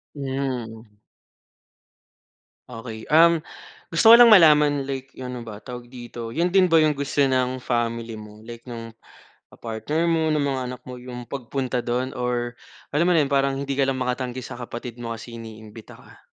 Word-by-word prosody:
Mm. 125 -6 -4 1.7
Okey. 115 -2 -8
Um, 165 0 +5 0.5
gusto 225 - +4
ko 230 - +12
lang 235 -2 +8
malaman, 150 -6 +6
like 135 0 -5
'yong, 125 -1 -7
ano 120 - -7
ba 105 -2 -9
tawag 125 -1 -8
dito, 120 -2 -8
'yon 170 +5 +1
din 190 +1 +4
ba 165 -2 +4
'yong 155 -2 +2
gusto 140 +1 -1
ng 130 -1 +1
family 115 -2 -2
mo, 105 0 -12
like 115 +1 -11
no'ng, 115 -2 -7 0.6
ah, - - -17
partner 120 +9 -2
mo, 160 -2 +2
ng 150 - +1
mga 135 -2 -1
anak 125 0 -6
mo, 125 - -7
'yong 125 -1 -9
pagpunta 130 -1 -3
do'n 125 +2 -2
or 120 -1 -2 0.3
alam 150 +4 +1
mo 180 - +3
na 165 - +4
'yon, 140 - +1
parang 140 -1 +2
hindi 140 -1 -3
ka 140 - +3
lang 135 -1 -1
makatanggi 125 0 -2
sa 120 - -8
kapatid 120 0 -7
mo 115 -1 -5
kasi 115 +1 -9
iniimbita 110 -1 -11
ka? - - -19
125 Hz, 180 wpm, -23 LUFS, 120-140 Hz, 1.7 s, ko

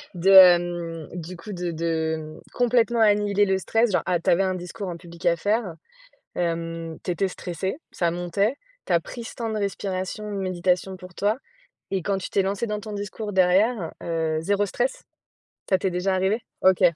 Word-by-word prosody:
de, 180 +2 +1
hem, 175 -3 +6
du 175 +1 -7
coup, 210 +4 -8
de 175 -1 -3
de, 160 -1 -1
mmh, 155 0 -9
complètement 240 -1 +2
annihiler 205 -1 +4
le 190 -1 +1
stress, 225 +4 +1
genre, 185 - +2
ah, 180 -2 +1
tu - - -1
avais 175 +3 +4
un 185 -1 0
discours 185 +3 -6
en 170 - -5
public 170 -1 -12
à 170 - +4
faire, 205 -1 0 0.6
hem, 165 -1 -3
tu - - -2
étais 185 +3 0
stressé, 185 +2 -4
ça 170 -1 0
montait, 175 +7 0 0.3
tu - - -1
as 170 - +4
pris 235 +7 -8
ce - - -8
temps 230 -2 -3
de 215 - -2
respiration, 200 +1 -3
de 200 - -3
méditation 185 0 0
pour 180 -1 -12
toi 205 +4 +1 0.5
et 190 -2 -1
quand 200 +3 0
tu 185 - -6
t'es - - +2
lancé 195 +4 -1
dans 210 -1 -3
ton 215 0 -8
discours 205 +1 -5
derrière, 190 +1 +3
heu, 160 -2 -1
0 200 +5 +1
stress? - - -2 0.7
Ça 190 - +3
t'est 190 - 0
déjà 180 +2 0
arrivé? 190 +5 +1 0.2
OK. 190 0 +4
185 Hz, 195 wpm, -24 LUFS, 170-205 Hz, 0.7 s, hem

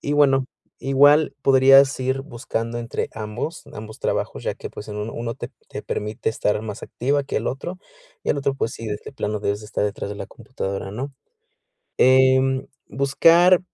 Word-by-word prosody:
y 145 - -2
bueno, 135 -3 +4 0.3
igual 145 +2 +4
podrías 135 0 +6
ir 130 +1 0
buscando 120 -3 -4
entre 120 0 -3
ambos 110 +9 -5
ambos 110 0 -9
trabajos, - - -2
ya - - -2
que, - - -8
pues, 105 - -9
en 105 - -6
uno 105 +2 -4
uno 115 0 -4
te - - -7 0.2
te - - -6
permite 105 +1 -3
estar 105 -2 0
más 105 -2 -6
activa 140 +3 -1
que - - -4
el 110 - -1
otro, 175 +8 -4 0.4
y - - -5
el - - +1
otro, 140 0 0
pues, 115 -3 -2
sí, 115 - -7
de 105 -1 -3
de - - -9
plano 105 -5 -2
debes 100 0 -1
estar 105 -1 -2
detrás 100 -1 -3
de 105 - -6
la - - -6
computadora, 95 0 -5
¿no?, 135 +7 -5 0.9
eh, 130 0 +6 0.5
buscar 165 +6 +5
130 Hz, 185 wpm, -22 LUFS, 110-140 Hz, 0.9 s, podrías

